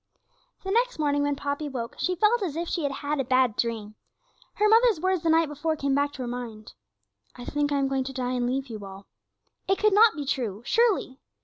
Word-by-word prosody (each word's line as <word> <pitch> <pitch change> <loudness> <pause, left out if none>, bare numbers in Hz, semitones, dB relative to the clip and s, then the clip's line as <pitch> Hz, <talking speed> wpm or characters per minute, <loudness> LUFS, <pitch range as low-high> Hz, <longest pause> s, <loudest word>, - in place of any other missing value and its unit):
The 385 - -3
next - - +1
morning 290 -2 +1
when 285 0 0
Poppy 285 +1 -3
woke 240 -4 -5
she 365 - 0
felt 425 +6 +3
as 340 -7 -3
if 340 +1 -3
she 340 - -2
had 285 -2 -1
had 295 0 -1
a - - +1
bad 255 -3 +2
dream. 220 -3 -2 0.6
Her 425 - +3
mother's 450 -3 +5
words 370 0 0
the 330 - 0
night 325 0 +4
before 295 +2 -2
came 280 -2 -1
back 285 +1 +1
to 260 - -6
her - - -4
mind. 235 -3 -7 0.6
'I 245 - -9
think 290 0 -1
I 285 - +1
am 275 -1 +1
going 270 -1 -1
to 270 - -5
die 250 -1 -2
and 245 -1 0
leave 265 +2 -1
you 220 -5 -8
all.' 195 0 -10 0.6
It 390 - +2
could 425 -1 +3
not 430 -1 +6
be 295 -2 -4
true, 235 -6 -3
surely! 410 - +1
285 Hz, 230 wpm, -26 LUFS, 250-345 Hz, 0.6 s, not